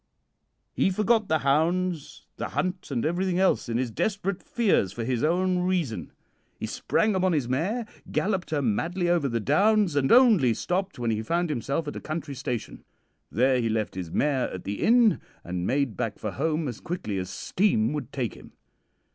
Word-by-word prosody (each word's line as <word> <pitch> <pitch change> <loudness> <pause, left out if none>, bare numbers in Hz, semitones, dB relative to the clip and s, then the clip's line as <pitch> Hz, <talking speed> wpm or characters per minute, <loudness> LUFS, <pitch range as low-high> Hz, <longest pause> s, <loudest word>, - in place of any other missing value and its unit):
"He - - +2
forgot 215 +2 +2
the 160 - +3
hounds, 165 +3 0
the - - -3
hunt, 185 0 -3
and 125 -5 -1
everything 180 +2 0
else 190 -8 +2
in 115 - 0
his 125 -2 -1
desperate 195 - -1
fears 200 - +1
for 115 - -5
his 120 0 -1
own 180 +3 +2
reason. 180 -10 -1 0.5
He - - -3
sprang 215 0 0
upon 185 -1 +2
his 145 -6 0
mare, 185 - -1 0.3
galloped 190 -3 0
her 150 -3 0
madly 170 - 0
over 170 -6 +2
the 115 -1 -1
downs, 195 - +3
and 135 -2 +2
only 215 - +6
stopped 185 - -2
when 120 -2 -1
he 110 0 -1
found 170 +7 0
himself 140 +4 -2
at 145 - -5
a - - -6
country 155 -2 -4
station. 120 -3 -5 0.5
There 125 +3 +3
he 115 - 0
left 110 -1 -1
his 90 -3 -5
mare 135 - 0
at 90 - -7
the 100 0 -4
inn, 235 -2 +4 0.2
and 90 0 -3
made 135 -4 0
back - - -3
for - - -4
home 155 +2 -1
as 120 - -5
quickly 110 - -3
as 90 0 -4
steam 115 - +1
would 140 -3 -5
take 125 -7 -2
him. - - -15
155 Hz, 185 wpm, -26 LUFS, 120-185 Hz, 0.5 s, only